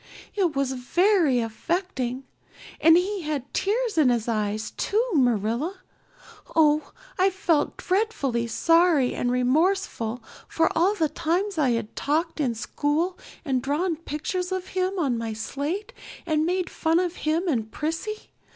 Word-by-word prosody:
It 365 -7 0
was 275 -1 0
very 300 - +2
affecting. 260 - -2 0.6
And 325 +1 +7
he 385 +2 -1
had 300 -4 -4
tears 435 -1 0
in 280 -5 +5
his 235 -2 0
eyes 215 -1 -1
too, 440 +4 0
Marilla. 245 - +1 0.8
Oh, 305 -1 +3 0.3
I 375 +1 +5
felt 360 -5 0
dreadfully 325 - 0
sorry 330 0 +3
and 245 - -1
remorseful 250 - +1 0.2
for 325 0 +1
all 370 +6 +3
the 320 -6 +1
times 345 +5 -1
I'd 230 -6 0
talked 315 +4 -1
in 250 -6 0
school 300 +9 -1 0.3
and 260 -3 0
drawn 320 +7 0
pictures 335 +4 -4
of 375 -1 -3
him 375 +1 -1
on 270 -9 0
my 225 -1 -3
slate 290 - -4 0.3
and 315 -1 +1
made 365 0 0
fun 325 0 +1
of 355 -1 -1
him 320 +4 0
and 225 -8 -1
Prissy. 325 - -4
315 Hz, 140 wpm, -25 LUFS, 250-365 Hz, 0.8 s, And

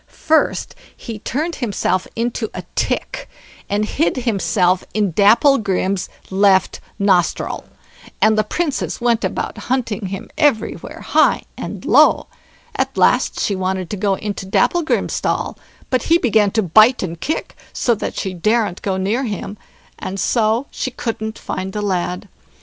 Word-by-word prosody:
First 315 0 0 0.2
he 225 -2 -7
turned 310 +10 -3
himself 200 -5 -1
into 230 -1 -2
a - - -5
tick, - - -2 0.4
and 205 +1 +1
hid 285 +6 0
himself 195 -6 +1
in 205 -3 +1
Dapplegrim's 200 - +3 0.2
left 190 0 +3 0.2
nostril; 190 -4 +1 0.5
and 220 - +4
the 215 - +2
Princess 295 +6 -2
went 235 -2 +1
about - - -3
hunting 230 -6 -2
him 195 +4 -7
everywhere, 290 -8 0
high - - +3
and - - -7
low; - - +5 0.5
at - - -2
last - - +3
she 200 - 0
wanted 185 -1 -2
to - - -1
go 200 0 +1
into 205 -1 -5
Dapplegrim's 330 - +1
stall, - - -1 0.4
but 255 -2 +2
he 330 +6 +4
began 220 -8 +3
to 220 +2 0
bite 215 +8 +5
and 170 -2 -5
kick, 315 - -3 0.2
so 240 - +1
that 220 - -4
she 190 -2 -2
daren't 210 +1 0
go 190 -2 -1
near 210 +8 0
him, 205 -2 -4 0.4
and 190 +1 -5
so 225 +4 +1
she - - -3
couldn't 220 -3 -4
find 190 +1 -5
the 210 - -2
lad. 180 0 -2
210 Hz, 145 wpm, -19 LUFS, 190-240 Hz, 0.5 s, low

